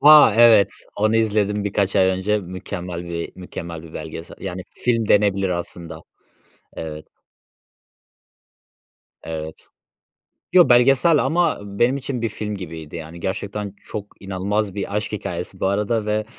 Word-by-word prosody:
Vay, 150 Hz, -6 st, +8 dB
evet. 100 Hz, -4 st, +6 dB, 0.3 s
Onu 110 Hz, +2 st, +2 dB
izledim 105 Hz, -2 st, +1 dB
birkaç 100 Hz, -1 st, 0 dB
ay 95 Hz, -1 st, +5 dB
önce. 95 Hz, +3 st, +1 dB
Mükemmel 90 Hz, -2 st, -6 dB
bir 85 Hz, -1 st, -5 dB
mükemmel 85 Hz, -3 st, -7 dB
bir 80 Hz, -1 st, -13 dB
belgesel. 80 Hz, +1 st, -7 dB
Yani 95 Hz, -1 st, -5 dB
film 115 Hz, -3 st, 0 dB
denebilir 100 Hz, -2 st, +3 dB
aslında. 85 Hz, -1 st, -5 dB, 0.7 s
Evet. 75 Hz, -1 st, -7 dB, 2.2 s
Evet. 80 Hz, -1 st, -7 dB, 0.9 s
Yo, 180 Hz, -1 st, +7 dB
belgesel 135 Hz, +6 st, +5 dB
ama 175 Hz, +1 st, +2 dB
benim 105 Hz, +6 st, +1 dB
için 130 Hz, -3 st, -4 dB
bir 115 Hz, -, +1 dB
film 105 Hz, 0 st, -5 dB
gibiydi, 80 Hz, -4 st, -8 dB
yani. 80 Hz, +1 st, -8 dB
Gerçekten 100 Hz, +2 st, -4 dB
çok 105 Hz, -1 st, -6 dB
inanılmaz 100 Hz, +1 st, -2 dB
bir 100 Hz, 0 st, -3 dB
aşk 105 Hz, +1 st, -2 dB
hikâyesi 90 Hz, -2 st, -5 dB
bu -, -, +1 dB
arada 105 Hz, +2 st, 0 dB
ve, 105 Hz, 0 st, 0 dB
100 Hz, 130 wpm, -22 LUFS, 90-110 Hz, 2.2 s, Vay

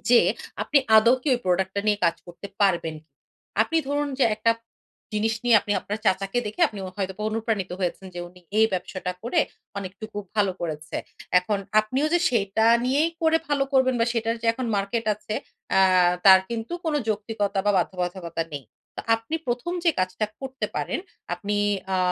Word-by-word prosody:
যে 245 Hz, -, +8 dB, 0.4 s
আপনি 295 Hz, -, +4 dB, 0.2 s
আদৌ 230 Hz, +3 st, +6 dB
কি -, -, -1 dB
ঐ -, -, +1 dB
product 185 Hz, +1 st, +2 dB
টা 200 Hz, -, 0 dB
নিয়ে 210 Hz, -1 st, +3 dB
কাজ 170 Hz, 0 st, +3 dB
করতে 175 Hz, +3 st, -9 dB
পারবেন। 175 Hz, -5 st, +2 dB, 0.7 s
আপনি 330 Hz, -, -2 dB
ধরুন 290 Hz, +1 st, 0 dB
যে -, -, +5 dB
একটা 230 Hz, +2 st, +3 dB, 0.6 s
জিনিস 220 Hz, +1 st, +1 dB
নিয়ে 235 Hz, -2 st, +6 dB
আপনি 205 Hz, -, -2 dB
আপনার 210 Hz, +2 st, -4 dB
চাচাকে 195 Hz, +4 st, +1 dB
দেখে 210 Hz, +12 st, -6 dB
আপনি 210 Hz, -, -9 dB
ও -, -, -5 dB
হয়তো 190 Hz, -2 st, -2 dB
অনুপ্রাণিত 220 Hz, -3 st, -2 dB
হয়েছেন 185 Hz, +1 st, -2 dB
যে 175 Hz, -, -4 dB
উনি 180 Hz, +1 st, -18 dB, 0.2 s
এই 220 Hz, -, +6 dB
ব্যবসাটা 180 Hz, 0 st, -3 dB
করে 245 Hz, +9 st, +2 dB, 0.4 s
অনেকটুকু 200 Hz, +2 st, -7 dB, 0.2 s
ভালো 205 Hz, -3 st, +2 dB
করেছে। 160 Hz, -2 st, -4 dB, 0.4 s
এখন 200 Hz, +3 st, -1 dB, 0.2 s
আপনিও 255 Hz, +8 st, -1 dB
যে 350 Hz, -, +5 dB
সেইটা 220 Hz, -1 st, +1 dB, 0.2 s
নিয়েই 285 Hz, +6 st, +2 dB
করে 320 Hz, 0 st, +4 dB
ভালো 285 Hz, -2 st, +2 dB
করবেন 260 Hz, -1 st, +4 dB
বা 230 Hz, -, +3 dB
সেইটার 230 Hz, -1 st, 0 dB
যে -, -, -2 dB
এখন 250 Hz, +2 st, -4 dB
মার্কেট 200 Hz, +4 st, -1 dB
আছে, 210 Hz, +1 st, -6 dB, 0.4 s
আ -, -, +6 dB, 0.5 s
তার 190 Hz, -1 st, +10 dB
কিন্তু 230 Hz, +4 st, -4 dB
কোনো 315 Hz, -2 st, +1 dB
যৌক্তিকতা 210 Hz, -2 st, -1 dB
বা 205 Hz, -, +4 dB
বাধ্যবাধকতা 175 Hz, -2 st, -2 dB
নেই। 140 Hz, -2 st, -6 dB, 0.5 s
আপনি 225 Hz, +7 st, -6 dB
১ম 245 Hz, +8 st, -2 dB
যে 340 Hz, -, +6 dB
কাজটা 185 Hz, +3 st, -1 dB
করতে 265 Hz, -1 st, -4 dB
পারেন, -, -, -1 dB, 0.4 s
আপনি 205 Hz, 0 st, -3 dB, 0.4 s
আ -, -, +2 dB
210 Hz, 175 wpm, -25 LUFS, 190-240 Hz, 0.7 s, তার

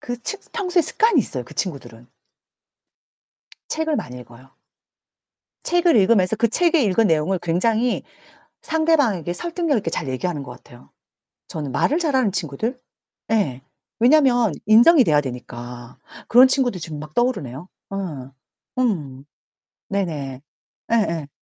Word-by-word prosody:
그 245 Hz, 0 st, -5 dB
측 410 Hz, -, -4 dB
평소에 365 Hz, -5 st, +1 dB
습관이 445 Hz, -2 st, +2 dB
있어요, 130 Hz, -, -4 dB
그 -, -, -14 dB
친구들은. 130 Hz, -, -5 dB, 1.6 s
책을 315 Hz, -1 st, -1 dB
많이 125 Hz, -, -6 dB
읽어요. 125 Hz, +2 st, -15 dB, 1.1 s
책을 350 Hz, -3 st, +3 dB
읽으면서 200 Hz, -1 st, +3 dB
그 230 Hz, +1 st, +2 dB
책에 335 Hz, +5 st, +2 dB
읽은 215 Hz, +2 st, +2 dB
내용을 160 Hz, +4 st, +1 dB
굉장히 220 Hz, +8 st, +1 dB, 0.6 s
상대방에게 285 Hz, -, +1 dB
설득력 335 Hz, -, -1 dB
있게 180 Hz, -5 st, -3 dB
잘 150 Hz, -, -3 dB
얘기하는 145 Hz, +4 st, -3 dB
것 125 Hz, -2 st, -9 dB
같아요. 120 Hz, 0 st, -17 dB, 0.6 s
저는 145 Hz, -4 st, -5 dB
말을 295 Hz, -, +1 dB
잘하는 265 Hz, -, +1 dB
친구들? 195 Hz, -, -3 dB, 0.5 s
예. 140 Hz, -, 0 dB, 0.4 s
왜냐하면 245 Hz, -, +4 dB
인정이 240 Hz, +7 st, +7 dB
돼야 150 Hz, -5 st, +3 dB
되니까. 120 Hz, -2 st, -8 dB, 0.3 s
그런 250 Hz, +2 st, +7 dB
친구들 255 Hz, -8 st, 0 dB
지금 155 Hz, -2 st, -6 dB
막 155 Hz, +1 st, -10 dB
떠오르네요. 175 Hz, -, -2 dB, 0.3 s
예. 150 Hz, -10 st, -5 dB, 0.5 s
음. 145 Hz, -, -2 dB, 0.6 s
네네. 150 Hz, -10 st, -3 dB, 0.5 s
예예. 170 Hz, -10 st, 0 dB
195 Hz, 285 characters per minute, -21 LUFS, -, 1.6 s, 인정이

